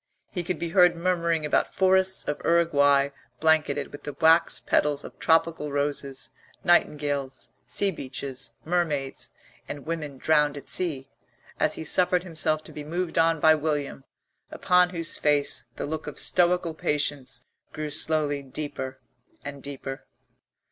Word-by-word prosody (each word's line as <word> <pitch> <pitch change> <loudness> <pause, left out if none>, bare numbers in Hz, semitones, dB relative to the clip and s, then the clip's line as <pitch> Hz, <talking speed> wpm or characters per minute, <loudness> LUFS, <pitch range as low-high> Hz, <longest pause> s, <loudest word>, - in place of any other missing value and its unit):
He 180 - -3
could 175 0 -2
be 170 +2 -3
heard 180 -1 +5
murmuring 170 -2 0
about 150 - 0
forests 190 0 +3
of 150 - -3
Uruguay 145 -5 +3 0.3
blanketed 160 -3 +2
with 145 - -10
the 145 - -6
wax 165 +2 +4
petals 145 -1 +1
of - - -11
tropical 160 -2 +2
roses, 140 -1 -2 0.3
nightingales, 145 -5 +1 0.2
sea 200 -1 +2
beaches, 135 -4 -6
mermaids, 155 -5 -1 0.4
and 145 -1 -7
women 155 -4 -4
drowned 150 0 +2
at 140 - -9
sea, 140 -7 -1 0.5
as - - +2
he - - -6
suffered 180 +2 +2
himself 155 -3 0
to - - -10
be 150 - -7
moved 170 +2 -2
on 165 0 +3
by 155 +1 +6
William, 150 -3 -2 0.5
upon 180 0 +3
whose 170 -2 -1
face 145 -3 +1
the - - -4
look 155 +1 -5
of 150 - -7
stoical 175 -2 +2
patience 145 -5 -2 0.3
grew 155 -1 -5
slowly 150 -2 +1
deeper 135 -1 -6 0.5
and 140 -1 -7
deeper. 135 -1 -7
155 Hz, 140 wpm, -26 LUFS, 145-170 Hz, 0.5 s, by